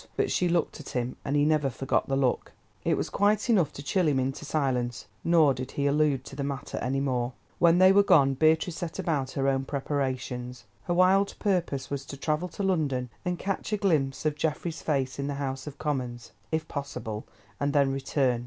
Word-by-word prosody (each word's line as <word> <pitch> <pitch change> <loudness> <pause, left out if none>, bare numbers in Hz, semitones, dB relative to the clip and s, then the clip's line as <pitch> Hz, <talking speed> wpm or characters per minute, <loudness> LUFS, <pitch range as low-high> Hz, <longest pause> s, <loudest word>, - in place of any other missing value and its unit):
But - - +1
she 180 - +2
looked 170 -2 0
at 150 - -9
him, 125 0 -2
and 140 - -1
he 145 0 +4
never 150 -3 +2
forgot 135 +1 -1
the 135 - +1
look. 135 -2 0 0.3
It - - +2
was - - -3
quite 210 +3 +2
enough 180 -10 +3
to 140 - -8
chill 180 +3 +1
him 140 -3 +2
into 135 +3 -2
silence, 125 -5 -1 0.2
nor 160 -4 +5
did 130 0 -6
he 140 - -1
allude 140 -2 +2
to 135 - -9
the 140 - -3
matter 140 0 -4
any 135 +2 -1
more. 125 -2 -1 0.3
When 170 0 +5
they 185 +1 +7
were 200 +1 +6
gone, 140 -8 +5
Beatrice 160 +4 +2
set 170 -2 -5
about 140 -6 -1
her 135 0 0
own 135 -1 +1
preparations. 130 -4 -3 0.2
Her 175 - 0
wild 190 +2 +4
purpose 175 -10 -1
was 140 -1 -2
to 140 - -7
travel 155 +5 -1
to 200 - -5
London, 140 -10 0
and 180 -1 -1
catch 195 +4 -3
a - - +2
glimpse 155 -9 0
of 155 - +2
Geoffrey's 160 +2 -2
face 135 -3 -1
in 140 - -2
the 145 - -2
House 135 0 -4
of 145 -1 -7
Commons, 125 -6 -3 0.2
if 160 0 -1
possible, 115 -7 -5 0.3
and 140 0 +1
then 140 -2 +3
return. 135 -2 0
140 Hz, 210 wpm, -28 LUFS, 135-165 Hz, 0.3 s, they